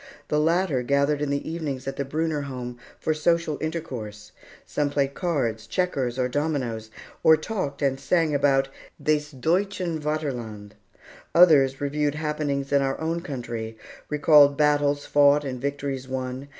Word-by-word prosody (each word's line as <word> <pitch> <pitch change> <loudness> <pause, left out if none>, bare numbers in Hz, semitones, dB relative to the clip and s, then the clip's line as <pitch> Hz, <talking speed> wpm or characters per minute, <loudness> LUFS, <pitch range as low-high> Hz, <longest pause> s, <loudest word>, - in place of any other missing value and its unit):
The 150 - +2
latter 165 -3 +2
gathered 140 +3 +1
in 150 - -1
the 140 0 -2
evenings 150 -5 -4
at 135 - -3
the 140 - -2
Brunner 155 +2 -1
home 125 -3 -6 0.2
for 155 - 0
social 160 -1 0
intercourse. 120 -10 -5 0.3
Some 145 -1 -1
played 140 -1 0
cards, 120 -11 -2
checkers, 135 -5 -1
and 125 -1 -1
dominoes, 130 -8 -2 0.3
or 160 0 +6
talked 155 -5 -4
and 135 -1 +1
sang 155 +3 +1
about 135 -1 +2 0.3
"des 155 -1 +2 0.2
Deutschen 180 +2 0
Vaterland." 125 -9 -4 0.6
Others 140 -6 +6
reviewed 145 +1 0
happenings 150 -3 -2
in 140 -1 +4
our 135 0 -1
own 165 +1 -2
country, 120 -7 -5 0.3
recalled 145 -1 +5
battles 145 -1 +2
fought 145 0 +4
and 125 -2 -5
victories 140 -2 -3
won. 130 +1 -4
145 Hz, 145 wpm, -25 LUFS, 130-155 Hz, 0.6 s, or